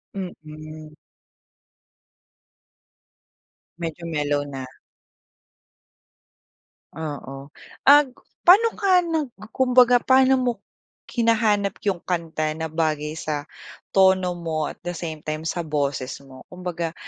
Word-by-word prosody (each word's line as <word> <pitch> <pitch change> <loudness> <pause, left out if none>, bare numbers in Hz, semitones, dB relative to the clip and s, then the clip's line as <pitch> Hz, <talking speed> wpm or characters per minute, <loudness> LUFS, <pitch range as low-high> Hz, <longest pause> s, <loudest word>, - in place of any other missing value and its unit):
Mm. 155 -4 -9 2.8
Medyo 170 0 -5
mellow 145 -2 0
na. 135 -2 -6 2.3
Oo, 140 -3 -7 0.4
ag 285 -2 +7 0.3
paano 405 +6 +8
ka 375 -4 +4
nag 320 -5 -2 0.2
kumbaga 250 -1 +5
paano 260 +1 +4
mo 250 -1 +1 0.5
hinahanap 215 -4 +1
'yung 190 -4 0
kanta 160 -3 -2
na 160 - -3
bagay 155 -1 -1
sa 150 -2 -3 0.5
tono 190 -2 +4
mo 160 -2 -2
at - - -10
the - - -2
same 160 -2 -6
time 155 +1 -4
sa 175 - -1
boses 140 -3 -2
mo, 130 -1 -14
kumbaga 175 -2 -4
170 Hz, 100 wpm, -23 LUFS, 155-230 Hz, 2.8 s, paano